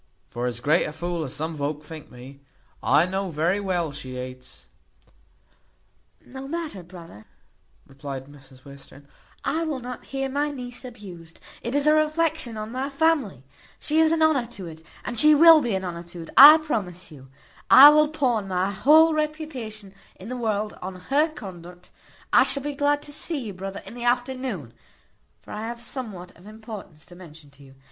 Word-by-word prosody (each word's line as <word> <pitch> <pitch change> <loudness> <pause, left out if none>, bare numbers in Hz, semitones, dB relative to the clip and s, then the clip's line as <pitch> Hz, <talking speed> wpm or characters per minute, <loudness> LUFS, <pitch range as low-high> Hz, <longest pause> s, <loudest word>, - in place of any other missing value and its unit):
For 120 +1 -3
as 120 -1 -4
great 150 +4 +2
a - - -4
fool 170 +1 -4
as 130 - -6
some 160 +3 -3
volk 150 0 -4
think 155 0 -11
me, 130 +3 -13 0.4
I 145 +5 +3
know 190 +1 -3
very 170 +5 0
well 180 -5 -2
she 130 -2 -8
hates 125 0 -9 1.0
" - - -39
"No 265 +1 -7
matter, 315 - -5
brother," 170 - -13 0.6
replied 135 -1 -8
Mrs 135 -2 -18
Western, 140 0 -14 0.4
"I 330 - 0
will 305 -5 -3
not 250 0 -8
hear 270 0 -3
my 285 +2 -1
niece 250 -3 -8
abused. 185 -9 -12 0.2
It 240 +4 -4
is 285 0 +1
a 305 - +5
reflection 310 -5 0
on 215 +1 -6
my 260 +3 -3
family. 275 - 0 0.3
She 310 +1 0
is 320 0 +4
an 325 -1 +2
honour 285 -7 +2
to 205 -6 -9
it; 160 -1 -11 0.2
and 240 - -1
she 305 0 +6
will 325 +1 +8
be 235 -7 -1
an 190 0 -3
honour 170 -1 -5
to 170 0 -10
it, - - -12
I 295 +3 +11
promise 190 - -5
you. 135 -3 -14 0.4
I 280 +3 +11
will 305 0 +4
pawn 250 -9 -1
my 185 +1 -1
whole 310 +10 +5
reputation 285 -10 -5 0.2
in 190 +5 -11
the 255 - -4
world 215 -3 -2
on 185 +1 -6
her 275 - 0
conduct. 180 - -11 0.4
I - - +7
shall 280 - +1
be 290 0 -3
glad 290 +1 0
to 290 - -9
see 320 +2 -1
you, 205 - -6
brother, 195 +1 -7
in - - -9
the 240 0 -6
afternoon; 245 - -2 0.7
for - - -13
I 215 +2 -5
have 235 0 -7
somewhat 210 -8 -7
of 180 +4 -17
importance 215 -7 -11
to 175 - -15
mention 160 -5 -15
to 140 0 -19
you. 135 -1 -17
210 Hz, 185 wpm, -24 LUFS, -, 1.0 s, I